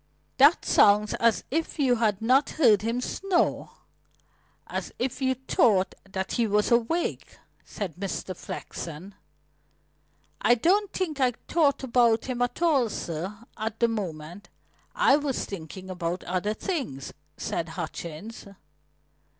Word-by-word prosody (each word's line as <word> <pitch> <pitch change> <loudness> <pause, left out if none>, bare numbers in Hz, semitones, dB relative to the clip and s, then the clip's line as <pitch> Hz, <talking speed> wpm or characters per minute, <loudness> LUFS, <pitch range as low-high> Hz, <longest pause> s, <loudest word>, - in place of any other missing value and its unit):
"That 285 +5 +6
sounds 210 +1 +4
as 230 -1 +3
if 320 +3 -2
you 260 -5 +3
had 220 -2 0
not 260 +5 +4
heard 225 -10 +5
him 230 +3 -1
snore 375 +6 0 1.0
as - - -5
if 255 +2 -3
you 260 0 +2
thought 220 -6 +2 0.2
that 190 0 -3
he 235 -2 +1
was 210 +3 +1
awake," 240 +9 0 0.3
said 190 -7 -6
Mr. 190 -1 -4
Flexen. 170 +3 -7 1.3
"I 240 - +5
don't 375 - +2
think 320 -6 -3
I 255 -2 +3
thought 295 -5 +2
about 235 -3 +3
him 250 -2 -3
at 245 +7 -1
all, 280 -9 +3
sir, 190 +4 -5
at 220 0 -4
the 235 - +4
moment. 180 -4 -5 0.5
I 275 - +5
was 285 -3 -2
thinking 185 0 -8
about 175 0 -3
other 185 +4 -1
things," 250 - -4 0.2
said 165 - -3
Hutchings. 170 +5 -7
225 Hz, 130 wpm, -26 LUFS, 190-265 Hz, 1.3 s, That